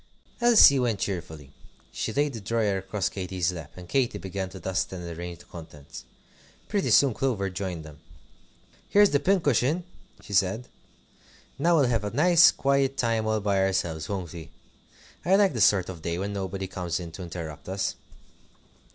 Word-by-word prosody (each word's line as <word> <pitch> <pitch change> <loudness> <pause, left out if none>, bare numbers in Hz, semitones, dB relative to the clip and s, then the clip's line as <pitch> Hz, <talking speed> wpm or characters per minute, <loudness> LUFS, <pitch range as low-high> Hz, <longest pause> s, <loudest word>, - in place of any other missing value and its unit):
Elsie 225 - +7
went 120 -4 0
cheerfully. 80 -8 -5 0.4
She - - -3
laid 145 0 0
the 115 - -7
drawer 105 -1 0
across 95 0 -2
Katy's 90 -2 -2
lap, 80 -4 -8
and 90 -1 -11
Katy 125 -1 0
began 95 -1 -5
to 95 0 -10
dust 95 +2 -2
and 90 -2 -7
arrange 85 +1 -7
the - - -17
contents. 75 -4 -11 0.6
Pretty 205 -2 -1
soon 140 -4 +5
Clover 105 -7 -1
joined 90 -4 -5
them. 75 -2 -13 0.9
"Here's 205 0 +5
the 145 - +3
cushion," 155 - +1 0.4
she 105 - -11
said. 100 +5 +1 0.9
"Now 170 +4 +3
we'll 145 -4 +4
have 115 -4 0
a 105 - -2
nice 170 - +6
quiet 135 0 +1
time 115 -2 0
all 110 -1 0
by 100 -1 +1
ourselves, 85 -5 -1
won't 95 -5 -4
we? 80 -4 -9 0.7
I 185 +3 +4
like 200 -4 +4
this 115 -5 +4
sort 95 -3 +3
of 90 -3 -8
day, 85 +1 -3
when 100 +2 -3
nobody 95 -1 -4
comes 90 -2 -3
in 85 -2 -7
to 85 - -9
interrupt 85 -2 -7
us." 95 +1 -1
100 Hz, 170 wpm, -26 LUFS, 90-125 Hz, 0.9 s, Elsie